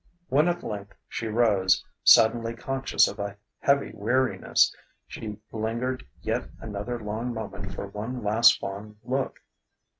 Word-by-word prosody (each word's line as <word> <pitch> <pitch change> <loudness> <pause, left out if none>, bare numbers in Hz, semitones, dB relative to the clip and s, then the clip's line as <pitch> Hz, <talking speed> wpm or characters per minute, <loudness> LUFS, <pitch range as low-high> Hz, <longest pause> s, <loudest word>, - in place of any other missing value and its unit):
When 150 +5 +4
at 175 0 -1
length 100 -2 -6
she 115 - -4
rose, 105 -4 +3 0.2
suddenly 115 +1 +6
conscious 135 +3 +2
of - - -7
a 100 0 -4 0.2
heavy 140 0 +2
weariness, 120 +5 +2 0.3
she 105 -2 -7
lingered 115 +2 -2 0.2
yet - - -2
another 110 +3 -4
long 115 +3 -3
moment 100 -4 -6
for - - -4
one 110 +5 -5
last 110 +3 +5
fond 105 +2 -7
look. 130 +1 -2
110 Hz, 130 wpm, -27 LUFS, 105-125 Hz, 0.3 s, suddenly